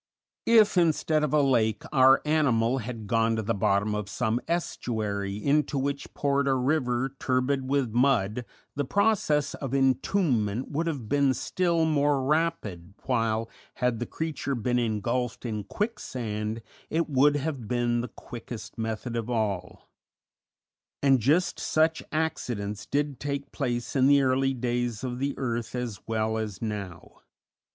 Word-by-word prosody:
If, 215 -5 +6
instead 155 -2 +2
of 150 - 0
a 150 -1 +4
lake, 110 -6 +2
our 135 -2 +6
animal 135 -5 +2
had 115 -2 -6
gone 115 +1 +2
to 110 - -2
the 115 +2 0
bottom 100 +1 +1
of 105 -1 -3
some 115 +2 -1
estuary 105 - -2
into 145 +5 +1
which 140 +1 -2
poured 140 -1 +1
a 135 - +3
river 130 -1 0
turbid 130 +1 0
with 135 -4 +1
mud, 120 -3 +2 0.3
the 145 - 0
process 195 -4 +1
of 135 -1 -4
entombment 130 - +1
would 160 +3 -1
have 140 -9 -3
been 140 +1 +2
still 170 -3 +1
more 145 -3 +2
rapid, 130 - -1
while, 115 -3 0 0.3
had 125 -3 0
the 120 - -3
creature 155 -3 -3
been 120 +1 0
engulfed 120 +2 -1
in 105 -3 -3
quicksand, 115 - -3 0.3
it 165 +1 0
would 145 +1 +4
have 140 -5 -3
been 120 0 +1
the 125 - -4
quickest 115 -2 -9
method 110 +2 -3
of 115 0 -3
all; 105 -6 -2 1.2
and 135 -2 +5
just 150 - +2
such 160 +1 +2
accidents 110 -10 -2
did 145 -2 -1
take 140 -1 -4
place 120 -3 -3
in 130 -1 +4
the 140 0 +5
early 135 +1 +2
days 120 -2 -2
of 125 -1 -3
the 140 +1 -1
earth 120 -2 -3
as 120 -6 -4
well 110 0 0
as 105 -4 -4
now. 100 -6 -6
125 Hz, 145 wpm, -27 LUFS, 110-145 Hz, 1.2 s, If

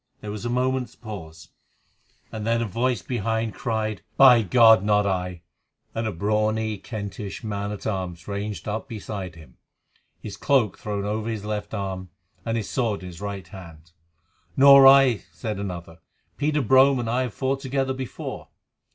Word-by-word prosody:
There 105 - -6
was 105 +2 -6
a - - -1
moment's 125 0 -1
pause, 80 -8 -10 0.8
then 115 +2 -1
a 115 - 0
voice 120 +1 -1
behind 115 -1 -2
cried: 110 -3 -2 0.2
"By 125 -4 +8
God! 110 -1 +6
not 105 0 +3
I," 90 -3 -2 0.5
and 115 0 -2
a - - -1
brawny 105 +2 0
Kentish 105 -1 -6
man 100 -1 -3
at 105 - -7
arms 90 -5 -4
ranged 100 -3 -4
up 110 +1 -3
beside 100 -5 -6
him, 75 -6 -16 0.6
his 100 -2 -8
cloak 130 -9 +1
thrown 100 -1 -3
over 110 +2 -2
his 110 -2 -4
left 105 +1 -4
arm, 95 -2 -4 0.3
and 115 0 -1
his 105 -3 -3
sword 115 -7 -1
in 90 - -7
his 85 +1 -12
right 100 -3 -5
hand. 85 -3 -12 0.7
"Nor 140 0 +9
I," 135 -4 +7
said 110 -4 -5
another. 85 -4 -6 0.4
"Peter 150 0 0
Brome 130 0 +5
and 115 - -4
I 120 +3 +1
have 125 -4 -4
fought 135 0 -1
together 135 0 -1
before." 130 -2 -6
110 Hz, 160 wpm, -24 LUFS, 100-120 Hz, 0.8 s, Nor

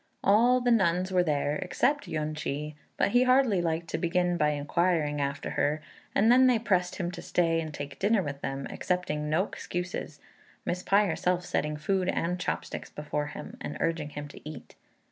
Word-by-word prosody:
All 240 +5 +5
the 245 0 +2
nuns 185 -4 +2
were 180 -1 +4
there 150 -3 0
except 290 +10 0
Yün 155 0 -2
ch'i, 150 0 -3 0.2
but - - +3
he 245 +4 +4
hardly 255 -7 +4
liked 165 0 -1
to 160 - -2
begin 175 +1 +1
by 150 -3 +2
inquiring 150 0 0
after 140 +1 -2
her; 150 +2 +1 0.4
and 220 +4 +5
then 255 +1 +7
they 250 -2 +4
pressed 185 -5 0
him 175 -2 -2
to - - -7
stay 165 -2 +1
and 160 -1 -5
take 145 -2 -7
dinner 205 0 +3
with 140 -2 -5
them, 135 0 -3
accepting 150 -5 -2
no 160 +5 +3
excuses, 175 -6 -5 0.5
Miss 180 +1 -1
Pai 200 +3 +3
herself 180 0 0
setting 150 -3 -1
food 185 +4 0
and 175 0 -1
chop - - -2
sticks - - -7
before 150 0 -3
him, - - -8
and - - -5
urging 165 -3 -1
him 145 0 -6
to - - -12
eat. 155 +1 -9
170 Hz, 190 wpm, -28 LUFS, 150-190 Hz, 0.5 s, then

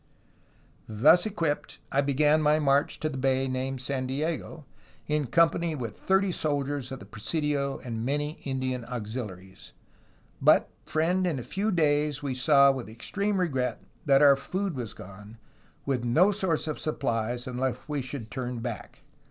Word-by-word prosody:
''Thus 155 - +5
equipped, 165 -8 -2
I 140 - +3
began 150 +2 +3
my 150 0 +4
march 140 -1 +2
to 155 - 0
the 135 -4 -4
bay 135 0 +1
named 130 0 -3
San 130 0 -2
Diego, 155 +2 -3 0.4
in 150 -2 0
"company 170 +3 +2
with 120 -6 -5
thirty 190 0 +1
soldiers 145 -4 -2
of 135 - -4
the - - -11
presidio 140 +6 -2
and 115 -2 -4
many 145 +4 -2
Indian 130 -2 -2
auxiliaries; 105 -7 -7 0.7
but, - - +4 0.2
friend, 180 +4 +1
in 160 -5 -1
a 125 - -5
few 205 - -1
days 150 -4 +1
we 140 -2 -1
saw 140 +2 +5
with 130 -4 -5
extreme 200 - -2
regret 130 -9 -1 0.2
that 140 +1 +5
our 140 -1 +8
food 185 +5 -3
was 120 -4 -5
gone, 100 +4 -12 0.5
with 130 -3 -1
no 160 +12 +4
source 185 -6 0
of 155 - -3
supplies 120 -5 -2
unless 130 0 -2
we 150 -2 -2
should 125 -3 -6
turn 125 -1 -4
back. 115 - -7
140 Hz, 155 wpm, -27 LUFS, 125-155 Hz, 0.7 s, our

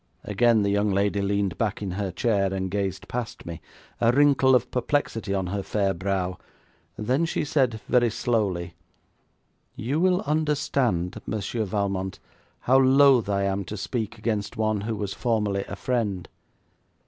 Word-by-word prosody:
Again 110 +1 +3
the 100 - +1
young 100 +1 +2
lady 100 +1 +1
leaned 100 -2 -1
back 110 -3 0
in 100 -3 -4
her 100 +1 -2
chair, 100 0 +1
and 95 -1 -3
gazed 95 -2 -2
past 120 -2 -5
me, 85 -1 -7 0.4
a 115 0 +4
wrinkle 135 -1 +5
of 125 0 +1
perplexity 125 -5 -1
on 95 -1 0
her 100 - -1
fair 100 -1 0
brow. 95 0 -2 0.6
Then 125 +9 +1
she 165 - -1
said 130 -6 +1
very 120 -2 +3
slowly: 100 -7 -1 1.0
'You 135 +7 -2
will 180 +1 +3
understand, 140 - 0
Monsieur 110 +1 -2
Valmont, 95 -1 -2 0.4
how 130 +2 +4
loath 135 -3 +5
I 100 -1 +1
am 100 0 0
to 105 - -6
speak 110 +3 -3
against 110 -2 -2
one 110 -2 0
who 110 +2 -3
was 100 -2 -3
formerly 105 -5 0
a - - -5
friend. 105 -6 -2
105 Hz, 155 wpm, -25 LUFS, 100-120 Hz, 1.0 s, wrinkle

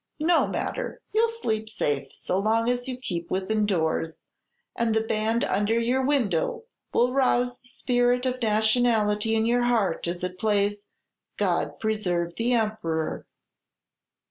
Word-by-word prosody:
No 335 0 +4
matter. - - -3
You 450 +2 +4
'll - - -5
sleep 220 - -3
safe 145 -9 -1
so 185 - -1
long 225 +3 +1
as 245 +1 -1
you 255 -1 -4
keep 170 -9 -4
within 205 +3 0
doors, 160 -3 0 0.6
and 230 -1 0
the 220 - +3
band 225 +1 0
under 210 +4 +1
your 250 +3 +1
window 270 - 0 0.3
will 250 +1 +2
rouse 250 -2 +2
the 245 - -23
spirit 245 0 +1
of 255 0 -1
nationality 220 -1 +2
in 220 0 +2
your 240 +1 +2
heart, 220 -9 +1
as 175 +1 -4
it 180 0 -4
plays, 205 -1 +1 0.6
'God - - 0
preserve 180 -6 -1
the 240 +2 +1
Emperor!'" 210 -9 -1
220 Hz, 145 wpm, -26 LUFS, 200-245 Hz, 0.6 s, No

